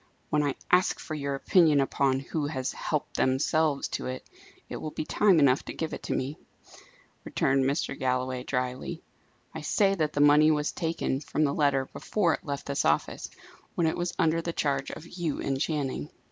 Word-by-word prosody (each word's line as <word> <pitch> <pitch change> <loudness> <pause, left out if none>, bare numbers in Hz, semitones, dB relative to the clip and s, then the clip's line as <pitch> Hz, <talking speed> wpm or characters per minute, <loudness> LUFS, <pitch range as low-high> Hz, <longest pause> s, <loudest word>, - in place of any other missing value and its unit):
"When 150 - +3
I 145 -2 0 0.2
ask 180 +1 +3
for 155 - -6
your 140 -2 -2
opinion 155 0 +4
upon 135 -1 +2
'who 145 +2 -3
has 130 -3 -2
helped - - -3
themselves 145 +3 +1
to - - -3
it,' 130 0 -6 0.4
it - - -5
will 155 - -5
be 155 - -5
time 200 0 +4
enough 140 -2 +4
to - - -6
give 160 - -3
it - - -7
me," 140 +4 -2 0.8
returned 135 -1 +1
Mr. 140 +3 0
Galloway, 130 0 -1
drily. 125 +5 -3 0.5
"I - - -6
say 195 -2 +2
that 155 -6 -1
the - - -2
money 145 +1 +6
was 150 -1 +1
taken 165 -5 -2
from 150 +1 -1
the 140 -2 +2
letter 140 -3 +2
before 180 -6 +1
it - - -5
left 140 -2 -4
this 140 0 -1
office, 75 - 0 0.5
when 170 - +1
it 160 - +1
was 175 0 -3
under 165 -2 +2
the 170 0 -3
charge 140 -3 -1
of 155 - -8
you 170 -3 -3
and 135 -1 -2
Channing." 140 - -2
145 Hz, 190 wpm, -28 LUFS, 135-160 Hz, 0.8 s, money